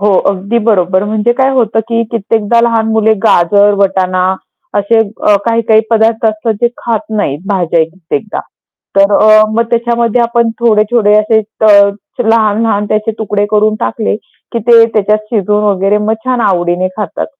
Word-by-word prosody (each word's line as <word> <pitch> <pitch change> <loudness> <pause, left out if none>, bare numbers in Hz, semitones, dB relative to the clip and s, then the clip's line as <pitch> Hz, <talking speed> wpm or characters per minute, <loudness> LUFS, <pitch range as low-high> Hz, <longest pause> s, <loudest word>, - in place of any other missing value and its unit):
हो, 200 -1 +2 0.2
अगदी 200 +4 -2
बरोबर. 185 -2 +1
म्हणजे 215 +3 0
काय 265 - +3
होतं 225 -3 +1
की 230 0 0
कित्येकदा 225 +1 0
लहान 230 -1 0
मुले 220 0 +2
गाजर, 205 +2 +3
वटाणा 185 -2 0 0.5
असे 225 +3 +1
अ, 210 -1 0
काही-काही 230 -1 +2
पदार्थ 225 0 +1
असतात 215 +1 -1
जे 240 - +2 0.2
खात 230 -3 -1 0.2
नाहीत 145 -9 -2
भाज्या 175 -4 0
कित्येकदा, 185 +5 -6 0.6
तर 200 +1 +4
अ, 215 0 +5
मग 230 +1 +1
त्याच्यामध्ये 235 0 0
आपण 235 0 0
थोडे-थोडे 215 -1 +2
असे 220 +1 +1
अ, 210 -1 +3 0.4
लहान-लहान 220 -1 +1
त्याचे 215 +1 -1
तुकडे 205 -2 -1
करून 215 0 +2
टाकले, 225 -2 -2 0.4
की 235 - -2
ते 230 -1 +6
त्याच्यात 210 0 +1
शिजून 210 -1 0
वगैरे 200 0 +1
मग 210 +1 -1
छान 255 -2 -1
आवडीने 175 0 -1
खातात. 210 - -4
215 Hz, 150 wpm, -11 LUFS, 200-230 Hz, 0.6 s, ते